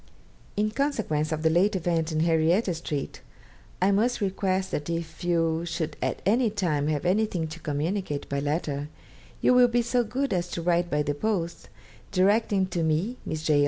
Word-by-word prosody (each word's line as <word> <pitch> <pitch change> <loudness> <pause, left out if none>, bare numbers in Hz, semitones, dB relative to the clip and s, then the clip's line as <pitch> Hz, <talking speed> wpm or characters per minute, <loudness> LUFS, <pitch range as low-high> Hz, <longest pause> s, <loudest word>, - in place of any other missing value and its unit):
'In 215 +1 +1
consequence 215 - -1
of 155 0 -2
the 160 - +4
late 190 +5 +3
event 165 -2 0
in 155 0 0
Henrietta 165 +4 +2
Street, 155 -4 -4 0.6
I 190 +2 +3
must 225 +5 +2
request 190 -2 -1
that 145 +2 -3
if 165 0 -4
you 165 -1 +1
should 160 -2 -3
at - - -2
any 230 +4 +3
time 170 -9 0
have 155 +1 -1
anything 185 -3 +1
to 165 +2 -8
communicate 155 +1 -2
by 140 - -2
letter, 145 0 -2 0.5
you - - +5
will 250 0 +7
be 240 0 +1
so 240 +1 +1
good 255 +1 -2
as 175 -1 0
to 170 - -2
write 175 0 +2
by 150 -1 +1
the 145 - -1
post, 170 -1 -2 0.4
directing 200 +1 +3
to 170 - 0
me 165 +10 0
(Miss 155 0 -3
J. 150 -2 +3
175 Hz, 180 wpm, -27 LUFS, 155-205 Hz, 0.6 s, will